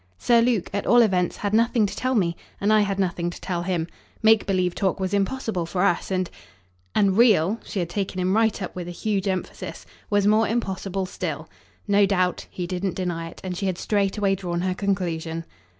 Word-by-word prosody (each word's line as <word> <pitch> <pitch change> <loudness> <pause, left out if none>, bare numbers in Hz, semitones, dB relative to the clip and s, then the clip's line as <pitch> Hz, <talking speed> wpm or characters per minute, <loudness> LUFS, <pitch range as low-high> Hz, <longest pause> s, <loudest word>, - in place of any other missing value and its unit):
"Sir 235 - +4
Luke, 230 -6 +1
at 200 - -2
all 240 0 +7
events, 180 -5 +1
had 205 0 -2
nothing 230 0 +3
to 195 - -4
tell 255 +1 0
me, 170 -6 +1 0.2
and 205 +2 +2
I 215 - +6
had 200 -1 0
nothing 175 -3 0
to 175 - -9
tell 175 -2 -3
him. 175 -2 -1 0.4
Make 220 -1 +5
believe 185 -2 +1
talk 195 0 0
was 190 0 -2
impossible 200 -3 -1
for 180 +2 -1
us, 190 -4 +1
and 185 -1 0 0.3
" 90 0 -39
"And 195 -2 +3
REAL" 215 -3 +4
she - - -7
had 175 -2 -1
taken 195 -1 -2
him 185 +2 +1
right 225 -1 +2
up - - -6
with 180 -1 -5
a 175 0 -7
huge 205 -2 -1
emphasis 185 -1 -4 0.2
"was 205 -1 +2
more 215 +1 +4
impossible 195 -4 -2
still." 185 - -5 0.4
No 200 -1 +4
doubt 185 -2 0
he 180 - -4
didn't 180 +1 -2
deny 170 -3 -3
it; - - -14
and 185 -1 -4
she 195 +2 -2
had 185 -2 -1
straightway 200 0 +1
drawn 175 -3 -2
her 185 0 0
conclusion. 170 -4 -2
190 Hz, 210 wpm, -24 LUFS, 180-205 Hz, 0.4 s, all